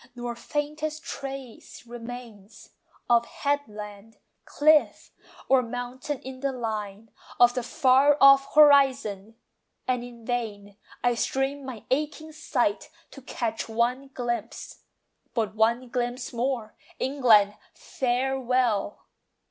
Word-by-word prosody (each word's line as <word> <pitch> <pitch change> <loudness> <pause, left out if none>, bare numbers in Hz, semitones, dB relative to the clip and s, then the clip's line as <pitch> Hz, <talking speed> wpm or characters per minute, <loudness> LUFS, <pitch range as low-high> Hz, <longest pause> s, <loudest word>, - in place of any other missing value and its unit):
nor 240 -1 -5
faintest 300 +4 -4
trace 270 -4 -8
remains 235 -3 -10 0.4
Of 235 -1 +3
headland, 215 -7 -4 0.3
cliff, 305 0 +2 0.4
or 265 -1 +5
mountain 245 +4 -5
in 260 0 -8
the 275 +1 -1
line 220 -3 -5 0.3
Of 245 0 +6
the 250 - -1
far 265 +4 +4
off 275 0 +6
horizon; 265 -8 +4 0.5
and 250 -1 0
in 235 -2 -12
vain 210 -5 -4 0.3
I 245 0 +3
strain 270 +4 -1
my 240 -5 -8
aching 305 +3 -2
sight 310 - -1 0.2
to 275 - -12
catch 230 -3 -4
one 240 +4 0
glimpse, 240 -4 -5 0.6
But 220 -3 -1
one 230 +3 +1
glimpse 245 +1 -3
more. 235 -2 -2 0.2
England, 230 -7 +4 0.2
farewell! 250 -4 -1
245 Hz, 110 wpm, -26 LUFS, 225-270 Hz, 0.6 s, Of